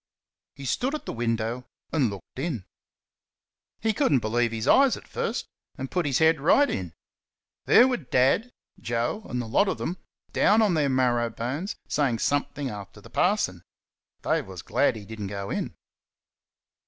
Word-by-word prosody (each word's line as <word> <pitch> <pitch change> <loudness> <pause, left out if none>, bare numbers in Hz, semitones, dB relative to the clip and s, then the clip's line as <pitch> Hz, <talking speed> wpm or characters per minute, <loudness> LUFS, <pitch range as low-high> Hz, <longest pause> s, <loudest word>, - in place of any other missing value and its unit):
He 140 - -9
stood 255 - 0
at 305 - -7
the - - -4
window 115 +1 -2 0.3
and 140 -7 +3
looked 100 +5 -9
in. 135 - -3 1.2
He 220 0 +1
could - - +1
n't 135 - +5
believe 115 +2 +1
his 110 -1 -3
eyes 275 -2 +5
at - - -14
first, - - -2 0.3
and 135 0 -5
put 180 -4 0
his 135 - +2
head 160 -1 +4
right 280 - +5
in. 90 - -4 0.7
There 245 - +7
were 255 -1 +1
Dad, 135 - +2 0.3
Joe, 120 - -2
and 125 - -2
the 120 - -3
lot 155 - +3
of - - -1
them 180 +2 -4 0.3
down 220 +2 +4
on 205 -4 +3
their 150 -4 +2
marrow 120 -3 +2
bones 130 - -4
saying 135 -6 +1
something 145 +2 -1
after 100 -4 -8
the - - -15
parson. - - +1 0.6
Dave - - 0
was - - -8
glad - - +2
that 110 - -7
he - - -12
did 110 +1 -8
n't 100 - -3
go 100 0 -5
in. - - -3
130 Hz, 180 wpm, -26 LUFS, 115-165 Hz, 1.2 s, There